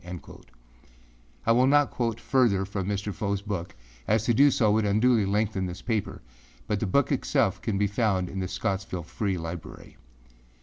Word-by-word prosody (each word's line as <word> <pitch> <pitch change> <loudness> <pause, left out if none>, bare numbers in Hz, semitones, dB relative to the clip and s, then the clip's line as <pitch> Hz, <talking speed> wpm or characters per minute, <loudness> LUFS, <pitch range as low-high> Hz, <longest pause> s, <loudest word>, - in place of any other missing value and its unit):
â 90 0 -10 1.0
I - - +4
will 125 +3 +4
not 145 0 +4
quote 115 -2 -2
further 110 -5 +2
from 95 -1 -4
Mr. 100 0 -2
Fowâs 100 -1 -3
book, 95 -5 -4 0.3
as 110 0 +2
to 120 - +3
do 140 +5 +6
so 110 -6 +2
would 110 +1 +2
unduly 110 +1 +3
lengthen 100 -2 0
this 90 +1 -8
paper, 110 - -2 0.4
but 105 - -1
the 110 - -1
book 140 +9 +2
itself 130 -7 +1
can 105 -4 -1
be 105 - +2
found 100 -3 0
in 95 - -5
the 95 - -2
Scottsville 95 -1 -3
Free 95 +3 -2
Library. 85 0 -8
105 Hz, 175 wpm, -27 LUFS, 95-115 Hz, 1.0 s, do